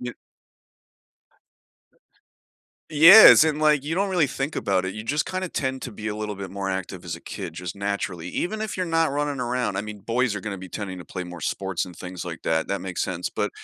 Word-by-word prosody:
y 125 0 -5 2.8
Yes, 165 +4 +10
and, 155 -1 0
like, 150 -2 +4
you 150 +3 -3
don't 195 +2 0
really 175 -5 +3
think 135 +2 -4
about 95 -2 0
it, 95 - -3
you 110 - -6
just 145 +6 0
kinda 185 0 -3
tend 130 -4 -2
to - - -5
be 110 0 -8
a 105 - -2
little 105 -1 -4
bit 100 -1 -7
more 100 0 -4
active 95 -1 -4
as 85 -1 -4
a - - -14
kid, 95 -6 -7
just 90 +1 -6
naturally, 100 -4 -3
even 215 - -3
if 220 -2 -4
you're 185 - -1
not 165 -2 +1
running 145 -1 -2
around, 125 -4 -1
I - - 0
mean, 105 0 -8
boys 115 +2 0
are 105 - -4
gonna 100 -1 -5
be 95 0 -9
tending 95 0 -6
to 90 - -9
play 90 - -6
more 90 -1 -9
sports 95 0 -2
and 90 -2 -12
things 90 0 -7
like 85 -1 -7
that, 80 0 0
that 100 - -2
makes 95 -2 -4
sense, 90 -1 -3
but - - -2
105 Hz, 225 wpm, -24 LUFS, 95-145 Hz, 2.8 s, Yes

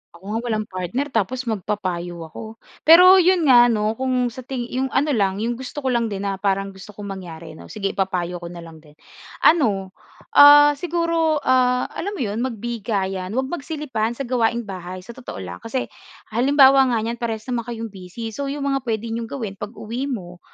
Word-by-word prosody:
Ako 170 - -17
nga 225 - -1
walang 215 -2 -1
partner, 185 +10 -3
tapos 245 +3 -1
magpapayo 185 -6 -3
ako. 220 +4 -9 0.3
Pero 365 +4 +9
'yon 365 -1 +3
nga 245 -4 +7
ano, 215 -2 +1
kung 255 -2 0
sa 245 - -10
ting 255 -1 -4
yung 260 +1 -1
ano 285 +3 +1
lang, 200 -7 +1
yung 240 +1 -2
gusto 265 +3 -7
ko 260 - +1
lang 235 -1 +1
din 200 -2 -5
na 195 -1 -2
parang 195 0 0
gusto 195 +2 -13
kong 205 -1 -7
mangyari 165 -3 -9
ano, 155 - -12
sige 200 -2 -3
ipapayo 180 -2 -2
ko 170 - -8
na 170 0 -9
lang 165 -1 -12
din. 150 -1 -20 0.5
Ano, 210 - +3 0.4
ah, 290 0 +9
siguro, 335 -2 0
ah, 250 -1 +2
alam 405 +3 -4
mo - - -5
'yon 210 0 -3
magbigayan, 210 -5 -3
'wag 265 +1 -1
magsilipan 280 -8 -3
sa 275 - -4
gawaing 235 -2 0
bahay, 185 -2 -7
sa 215 - -10
totoo 240 - -8
lang. 90 0 -8
Kasi 255 +3 -4 0.4
halimbawa 270 +3 +5
nga 240 -2 +1
niyan, 230 +1 -4
parehas 225 -2 -3
naman 235 -1 -2
kayong 230 -2 -5
busy, 195 +4 -8
so 280 +5 -4
yung 280 +1 -4
mga 275 -1 0
puwede 225 0 -2
niyong 230 0 -3
gawin 220 -7 -6
pag-uwi 230 +5 -5
mo 180 -9 -6
230 Hz, 195 wpm, -22 LUFS, 195-265 Hz, 0.5 s, Pero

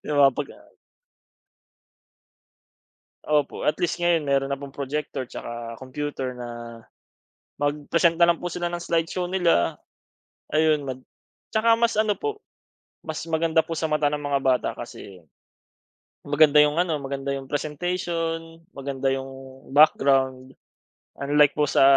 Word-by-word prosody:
Yung 150 - 0
mga 135 - +6
paga 145 +2 -5 2.7
Opo, 150 -2 0
at 150 - +3
least 175 0 0
ngayon 175 -2 +2
mayro'n 140 -1 +1
na - - +3
pong 140 -1 -7
projector 140 -1 -3
'tsaka 115 -1 -7
computer 130 -1 -4
na 120 -1 -6 1.1
magpresent 150 +4 +1
na 170 - +7
lang 170 - +4
po 175 0 -5
sila 175 0 -2
ng 175 0 -5
slide 165 -1 0
show 180 0 -2
nila. 175 - +1 0.7
Ayun, 155 -1 +3
mag 130 -2 -5 0.6
'tsaka 225 +1 +4
mas 235 0 +2
ano 215 -1 +1
po, 430 0 -4 0.6
mas 160 -1 -5
maganda 160 0 +2
po 165 - -11
sa 160 - 0
mata 150 -1 +1
ng 150 - -2
mga 145 -1 0
bata 130 -2 +2
kasi 90 -4 -10 1.0
maganda 150 0 +6
'yong 150 +3 +1
ano, 170 -3 +1
maganda 140 -1 -5
'yong 135 - -6
presentation, 165 +1 -3
maganda 135 -1 -2
'yong 135 0 -7
background. 135 -2 +3 0.6
Unlike 145 +1 +3
po 150 - +2
sa - - +3
150 Hz, 135 wpm, -24 LUFS, 135-165 Hz, 2.7 s, na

